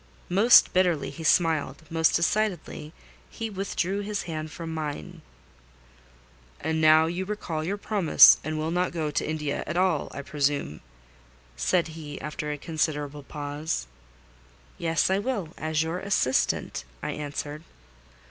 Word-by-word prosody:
Most 205 +7 +6
bitterly 180 -5 +2
he 165 - -9
smiled—most 160 0 +2
decidedly 170 -4 -1 0.4
he 225 -1 -5
withdrew 195 0 -2
his 205 0 -3
hand 155 -2 -5
from 165 +1 -6
mine. 150 - -5 1.4
"And 160 0 -1
now 155 0 +6
you 175 +3 -2
recall 185 -6 -4
your 195 +5 -2
promise, 200 -5 +6
and 155 +1 -3
will 155 +1 -2
not 180 0 0
go 155 -3 -2
to 145 - -1
India 150 -2 -2
at 170 - -2
all, 180 -5 +2
I 140 - -6
presume?" 140 - -1 0.7
said 160 - +1
he, 155 -2 -8
after 150 0 -4
a 150 - -3
considerable 150 -2 -2
pause. 145 - -4 0.9
"Yes, 165 +2 +1
I 190 - +2
will, 205 -7 -2
as 155 0 -1
your 165 +3 -3
assistant," 160 -10 0 0.2
I - - -2
answered. 150 +1 -5
160 Hz, 135 wpm, -26 LUFS, 150-180 Hz, 1.4 s, Most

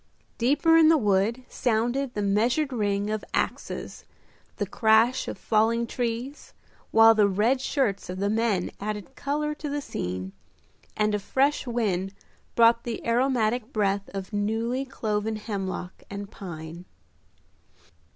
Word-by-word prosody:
Deeper 295 +7 +4
in 320 -1 +7
the 325 - +6
wood 210 +1 +1
sounded 245 +2 -1
the 205 - -1
measured 240 +8 +1
ring 205 -2 0
of 215 -1 -2
axes, - - -3 0.5
the 205 - -1
crash 225 +3 +3
of - - -5
falling 225 +2 +2
trees, 245 +4 -4 0.3
while 225 0 +7
the 210 -2 +4
red 220 +7 +1
shirts 240 -10 -1
of 180 - -4
the 200 +1 0
men 215 -4 0
added 210 +5 -5
color 300 +2 -2
to 300 0 -6
the 290 +1 -2
scene, 95 - -4 0.7
and 210 0 +2
a 210 - +1
fresh 270 +7 +1
wind 200 -5 -1 0.4
brought 230 0 +5
the 235 -2 -5
aromatic 240 -1 +1
breath 200 -3 0
of 195 +1 -6
newly 225 +6 -1
cloven 220 -4 -2
hemlock 195 -4 -5
and 200 +1 -7
pine. 170 -2 -8
220 Hz, 135 wpm, -26 LUFS, 200-250 Hz, 0.7 s, in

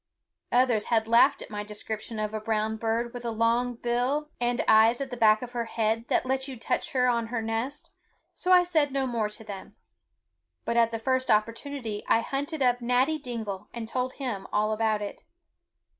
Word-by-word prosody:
Others 245 -4 +3
had 220 -2 +1
laughed 235 +4 +4
at - - -13
my 210 0 -4
description 215 +1 -6
of 215 0 -2
a 215 - -2
brown 220 0 -1
bird 230 +2 -1
with 245 -1 -7
a 235 - -2
long 230 +2 +1
bill 250 +6 -1
and 240 0 0
eyes 220 +2 +6
at 275 - -4
the - - -3
back 220 -1 +4
of 245 - -7
her 240 -1 -2
head 225 0 -1
that - - +1
let 265 +1 -1
you 265 -2 -7
touch 225 - -2
her 250 -1 +3
on 235 -2 +1
her 235 0 -2
nest, 225 +6 -3 0.4
so 365 - -1
I 360 -1 +8
said 315 -5 +1
no 270 0 0
more 230 -4 -1
to 210 +1 -9
them; 200 -3 -9 0.9
but 235 - -1
at 230 -1 +4
the 230 - -3
first 260 +3 0
opportunity 225 +1 -1
I 225 - +4
hunted 280 +4 -2
up 245 -1 +2
Natty 255 +6 +2
Dingle 220 -6 -5
and 230 -1 -5
told 255 +2 -2
him 225 -9 -4
all 215 +1 +1
about 215 -1 0
it. 205 - -7
235 Hz, 200 wpm, -27 LUFS, 220-255 Hz, 0.9 s, I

